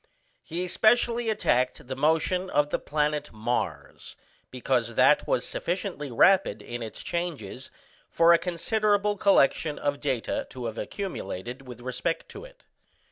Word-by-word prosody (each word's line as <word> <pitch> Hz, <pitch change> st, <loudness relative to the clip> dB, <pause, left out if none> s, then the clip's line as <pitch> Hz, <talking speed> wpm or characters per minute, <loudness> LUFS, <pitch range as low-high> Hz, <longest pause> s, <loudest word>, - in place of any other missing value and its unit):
He 175 Hz, +3 st, -4 dB
specially 235 Hz, +4 st, +2 dB
attacked 125 Hz, -, 0 dB
the 130 Hz, +1 st, -5 dB
motion 160 Hz, +6 st, +1 dB
of 145 Hz, 0 st, +1 dB
the -, -, 0 dB
planet 150 Hz, 0 st, -1 dB
Mars, 110 Hz, -10 st, -4 dB, 0.3 s
because 125 Hz, -2 st, -1 dB
that -, -, +4 dB
was -, -, +1 dB
sufficiently 175 Hz, -5 st, -3 dB
rapid 190 Hz, +11 st, +3 dB
in 120 Hz, 0 st, -6 dB
its 110 Hz, -2 st, -7 dB
changes 150 Hz, -, -4 dB, 0.4 s
for 170 Hz, +1 st, +5 dB
a 170 Hz, -, +5 dB
considerable 205 Hz, +4 st, +1 dB
collection 160 Hz, -6 st, +3 dB
of 145 Hz, 0 st, -2 dB
data 130 Hz, -6 st, -2 dB
to 125 Hz, -2 st, -7 dB
have 115 Hz, 0 st, -4 dB
accumulated 125 Hz, -, -5 dB
with 120 Hz, -1 st, -10 dB
respect 130 Hz, +7 st, -3 dB
to 415 Hz, -, -9 dB
it. -, -, -17 dB
150 Hz, 135 wpm, -27 LUFS, 125-190 Hz, 0.4 s, for